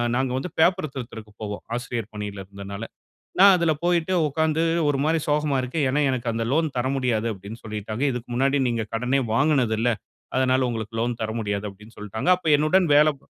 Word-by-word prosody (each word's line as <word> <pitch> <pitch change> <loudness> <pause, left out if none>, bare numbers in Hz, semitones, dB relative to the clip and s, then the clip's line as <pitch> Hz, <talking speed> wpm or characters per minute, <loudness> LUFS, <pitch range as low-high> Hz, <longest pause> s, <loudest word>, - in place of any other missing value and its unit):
நாங்க 130 0 0
வந்து 155 +7 -3
பேப்பரு 175 0 +3
திருத்துறதுக்கு 110 -5 -8
போவோம். 105 -1 -5
ஆசிரியர் 120 -3 -4
பணில 105 -2 -5
இருந்தனால. 100 +2 -8 0.6
நான் 195 0 +9
அதுல 170 -2 +2
போயிட்டு 175 0 +1
உட்காந்து 160 +2 0 0.3
ஒரு 145 - +1
மாரி 160 +1 +2
சோகமா 150 -1 +1
இருக்கேன். 135 +4 -1
ஏன்னா 140 +3 +1
எனக்கு 120 -2 -2
அந்த 115 0 -1
லோன் 160 +2 +2
தர 125 +1 0
முடியாது 120 -4 0
அப்டின்னு 100 +4 -10
சொல்லிட்டாங்க. 110 +3 -4
"இதுக்கு 125 0 -6
முன்னாடி 135 +3 +2
நீங்க 115 -1 -1
கடனே 125 +4 +1
வாங்குனது 135 -3 +2
இல்ல. 120 +2 +2 0.5
அதனால 130 0 +2
உங்களுக்கு 115 -1 -4
லோன் 120 0 -2
தர 110 - -2
முடியாது" 100 -1 -2
அப்படின்னு 105 +3 -17
சொல்டாங்க. 105 - -3
அப்ப 180 -3 -3
என்னுடன் 165 +4 +3
வேலப் 150 -2 +4
125 Hz, 180 wpm, -24 LUFS, 110-150 Hz, 0.6 s, நான்